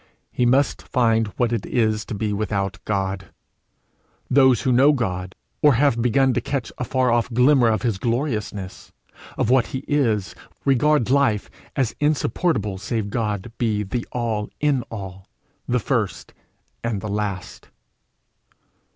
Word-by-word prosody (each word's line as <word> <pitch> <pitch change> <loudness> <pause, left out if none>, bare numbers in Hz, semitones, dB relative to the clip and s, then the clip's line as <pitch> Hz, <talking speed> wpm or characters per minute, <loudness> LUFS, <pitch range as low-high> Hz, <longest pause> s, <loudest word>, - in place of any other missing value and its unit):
He 120 - +1
must 135 +3 +2
find 115 -3 +1
what 120 -2 +1
it 115 -4 -1
is 110 -3 0
to - - -5
be 105 0 -2
without 100 -3 -2
God! 95 -2 -2 1.0
Those 130 -3 +5
who 130 - +2
know 135 +5 +5
God, 95 -8 -3 0.3
or 145 -4 +5
have 140 0 +3
but 120 - -2
begun 130 +3 +3
to - - 0
catch 140 -4 -3
a - - -1
far 130 0 +1
off 120 +1 +1
glimmer 125 +1 +4
of 110 +1 +1
his 115 -6 0
gloriousness, 110 -6 -3 0.5
of 115 - +1
what 130 -2 +4
he 130 - -5
is, 115 -10 +1 0.3
regard 135 -1 +3
life 135 -7 +2 0.2
as 130 -5 0
insupportable 145 - 0
save 105 -1 -3
God 105 -1 -2
be 110 -3 0
the 115 +4 -4
All 115 -4 -2
in 145 -3 +2
all, 95 -3 -8 0.4
the 125 - +1
first 115 -3 -2 0.5
and 115 -3 -1
the 105 - -5
last. 100 -2 -4
115 Hz, 150 wpm, -22 LUFS, 105-130 Hz, 1.0 s, Those